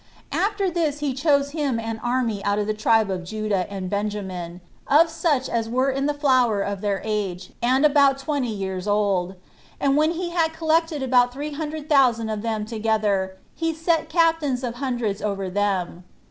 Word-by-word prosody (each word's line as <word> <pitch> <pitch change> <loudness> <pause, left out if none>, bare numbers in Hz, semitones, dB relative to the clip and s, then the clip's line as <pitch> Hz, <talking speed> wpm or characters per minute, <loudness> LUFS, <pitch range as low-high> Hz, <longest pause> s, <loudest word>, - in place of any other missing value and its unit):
After 405 -1 0
this 320 -4 0
he 290 -2 -2
chose 280 0 +2
him 285 -6 -1
an 225 0 -4
army 240 -4 -1
out 205 0 +1
of 210 - 0
the 215 - -1
tribe 215 -1 +2
of 185 -2 -3
Judah 205 -1 -2
and 190 -2 -4
Benjamin, 190 -4 -4 0.3
of 320 +4 +5
such 310 -5 0
as 225 -1 -2
were 255 +3 +1
in 275 +1 -1
the 295 - +1
flower 255 -8 +2
of 200 -1 -4
their 200 -2 -1
age, 195 -4 -3
and 260 +4 +3
about 280 -2 +5
twenty 275 -3 -2
years 190 -2 -4
old; 200 -3 +1 0.4
and 275 -1 +2
when 310 +3 +3
he 345 0 -4
had 325 -2 +1
collected 320 -2 +1
about 245 -1 +3
three 290 +4 -5
hundred 305 0 -5
thousand 245 -7 +3
of 215 -1 -3
them 220 -2 -2
together, 215 -4 0 0.2
he 325 -1 -2
set 325 -1 0
captains 320 -6 +2
of 245 -1 -4
hundreds 240 -6 -2
over 195 -3 -2
them. 190 -3 -1
245 Hz, 180 wpm, -23 LUFS, 205-295 Hz, 0.4 s, of